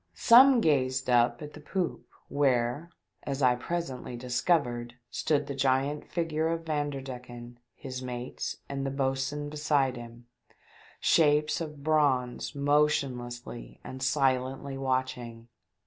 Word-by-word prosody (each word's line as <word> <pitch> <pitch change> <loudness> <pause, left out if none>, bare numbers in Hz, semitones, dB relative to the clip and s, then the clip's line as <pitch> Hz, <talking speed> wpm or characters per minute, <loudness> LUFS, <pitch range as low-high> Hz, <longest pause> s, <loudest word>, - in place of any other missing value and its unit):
Some 250 +1 +7
gazed 130 - +1
up 120 +2 +3
at 150 - -9
the - - -10
poop, 175 +4 -3 0.2
where, 135 +2 +1 0.3
as 140 -1 -3
I 125 -1 +6
presently 130 -3 -4
discovered, 125 -1 0 0.2
stood 150 -2 0
the 140 - -5
giant 135 +2 0
figure 160 -2 -1
of 165 0 -2
Vanderdecken, 130 -5 -5 0.2
his 130 -2 -7
mates 125 0 -5
and 140 -1 -4
the 135 - -1
boatswain 135 +2 -2
beside 145 -4 +1
him, 120 0 -11 0.7
shapes 150 0 +3
of 150 -3 -7
bronze 145 -4 +1
motionlessly 140 -5 -1
and 130 0 -8
silently 135 0 0
watching. 130 -3 -3
135 Hz, 115 wpm, -29 LUFS, 125-150 Hz, 0.7 s, Some